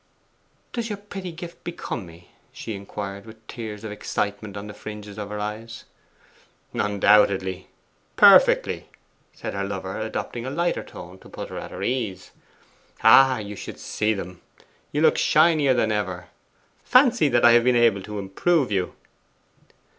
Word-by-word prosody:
'Does 235 -1 -3
your 205 - -3
pretty 195 -3 -7
gift 170 +1 -10
become 170 - -5
me?' 85 +1 -16 0.2
she 110 - -7
inquired, 100 0 -6
with 110 0 -14
tears 110 -3 -7
of 110 - -5
excitement 105 0 -3
on 100 - -6
the 105 - -8
fringes 105 -1 -9
of 105 -1 -5
her 105 0 -5
eyes. 110 +2 -6 0.9
'Undoubtedly, 100 -2 +2 0.5
perfectly!' - - +5 0.4
said - - -7
her 100 0 -2
lover, 95 0 -5
adopting 110 +2 -4
a 130 - -4
lighter 170 +5 -1
tone 90 +2 -11
to - - -16
put - - -7
her - - -6
at - - -8
her - - -7
ease. 110 -7 -3 0.7
'Ah, 130 +3 +7
you 105 -1 -6
should - - -8
see 110 0 -1
them; 90 -4 -5 0.5
you 150 - -1
look 155 - +4
shinier 155 -4 +4
than 110 -2 +1
ever. 95 -4 -3 0.5
Fancy 250 - +4
that 120 -2 +3
I 120 - +8
have 120 0 +5
been 125 0 +3
able 115 -4 +3
to 105 +2 -7
improve 125 - 0
you! 95 -3 -1
105 Hz, 155 wpm, -24 LUFS, 100-130 Hz, 0.9 s, I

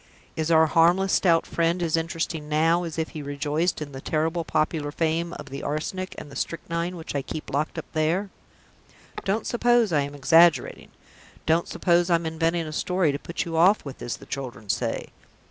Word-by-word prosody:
Is 160 0 -1
our 160 -1 +6
harmless 175 +4 +3
Stout 170 -3 +3
Friend 170 +1 0
as 165 -2 +1
interesting 165 -2 -3
now 165 +3 +2
as 165 -1 -6
if 160 -1 -1
he 155 - -7
rejoiced 150 +4 -1
in 145 - -10
the 135 -1 -8
terrible 160 +3 -1
popular 155 -2 -1
fame 165 +2 -1
of - - -9
the 140 - -5
Arsenic 170 +6 -3
and 145 - -9
the - - -11
Strychnine 170 +1 -3
which 165 -2 -7
I 140 - 0
keep 155 +3 -7
locked 150 +3 -1
up - - -4
there? 165 +6 0 0.9
Don't 205 +3 0
suppose 240 -4 +2
I 145 - +3
am 140 +1 -5
exaggerating! 165 +4 +4 0.6
Don't 165 +2 +2
suppose 175 0 +2
I'm 170 -1 +2
inventing 165 +1 0
a 155 - -6
story 180 -1 +1
to 140 - -4
put 170 - -4
you 165 -1 -4
off 180 +5 +4
with, 140 - -8
as 120 - -4
the - - -14
children 125 -6 -6
say. 115 +2 -1
165 Hz, 190 wpm, -25 LUFS, 150-170 Hz, 0.9 s, our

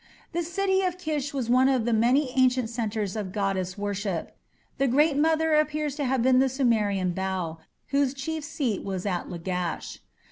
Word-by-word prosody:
The 345 0 -1
city 380 +3 +1
of 365 -1 -1
Kish 305 -5 -2
was 265 -4 -2
one 255 +2 +4
of 255 -4 +1
the 240 - +1
many 250 +5 +3
ancient 255 -3 +3
centres 220 -4 -2
of 205 -4 -4
goddess 190 -2 -1
worship. 200 -3 -3 0.4
The 275 - +3
Great 290 +4 +3
Mother 320 +1 +2
appears 305 -1 +1
to 290 - -1
have 255 -2 +1
been 255 0 +5
the 265 0 +3
Sumerian 215 -8 +1
Bau, 180 -3 -3 0.3
whose 280 -1 +1
chief 315 +3 -4
seat 285 - -2
was 190 -1 -4
at 180 -3 -2
Lagash. 180 0 -4
255 Hz, 175 wpm, -26 LUFS, 200-295 Hz, 0.4 s, been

